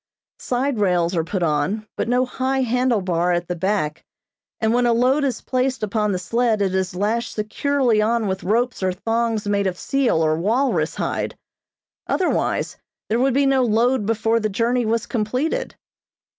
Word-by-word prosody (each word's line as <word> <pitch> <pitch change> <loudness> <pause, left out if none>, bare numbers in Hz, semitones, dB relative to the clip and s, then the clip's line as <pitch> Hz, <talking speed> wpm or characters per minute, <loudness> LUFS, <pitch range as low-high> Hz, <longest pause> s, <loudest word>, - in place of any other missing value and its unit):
Side 255 -1 -1
rails 180 -3 +1
are 165 - +1
put 180 +2 -2
on, 190 +7 0
but - - -2
no 250 +1 +2
high 260 +1 -1
handle 250 -2 +1
bar 180 -1 +1
at 175 0 -1
the 180 - -2
back, 170 -4 -1 0.6
and 220 0 +1
when 245 0 +3
a 235 - +3
load 255 +5 +2
is 260 -4 -1
placed 255 -1 -1
upon 210 0 0
the 185 - 0
sled 230 +4 0
it 195 -2 0
is 190 -1 -1
lashed 220 +5 -1
securely 235 +2 +1
on 225 +1 +1
with 190 -1 -2
ropes 240 +4 0
or 185 -1 +1
thongs 225 +2 -1
made 200 -1 +1
of 180 -1 -3
seal 260 - +1
or 155 0 +2
walrus 225 - 0
hide; - - -3 0.7
otherwise 370 - 0 0.3
there 225 +2 +1
would 260 0 +2
be 280 0 +3
no 270 -1 +3
load 235 0 +2
before 225 +1 +1
the 215 -1 -1
journey 235 +3 0
was 230 +1 0
completed. 255 - -2
225 Hz, 175 wpm, -21 LUFS, 195-250 Hz, 0.7 s, when